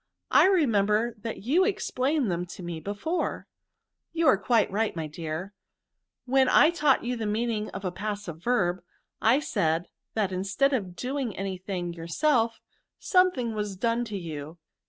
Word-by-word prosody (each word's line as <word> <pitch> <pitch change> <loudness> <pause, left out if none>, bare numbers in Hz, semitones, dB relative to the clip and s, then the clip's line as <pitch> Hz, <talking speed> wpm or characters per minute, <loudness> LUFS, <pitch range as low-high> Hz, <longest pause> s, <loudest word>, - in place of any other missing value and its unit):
I - - +7
remember 230 - +2
that 225 -2 -6
you 305 - +3
explained 290 - 0
them 175 +1 -2
to 180 - -9
me 170 -2 -5
before," 205 - -3 0.3
" - - -57
You 330 0 +1
are - - +6
quite 220 0 +2
right, 215 +1 0
my 160 -2 -3
dear; 160 +5 -5 0.7
when 265 +1 +3
I 315 - +6
taught 300 -6 +2
you 245 +1 -1
the 225 -2 -3
meaning 215 0 -1
of 195 - -7
a 180 - -1
passive 200 -4 -5
verb, 190 -7 +1 0.4
I 240 +5 +4
said, 165 - 0 0.3
that 205 -4 +1
instead 195 +10 +1
of 190 -8 -2
doing 255 +1 -3
any 195 -1 -3
thing 180 -2 -4
your 165 -1 -8
self, 230 - +2 0.4
something 360 - +2
was 210 -2 -3
done 230 +4 0
to 210 -3 -5
you. 160 -2 -7
210 Hz, 165 wpm, -27 LUFS, 180-255 Hz, 0.7 s, I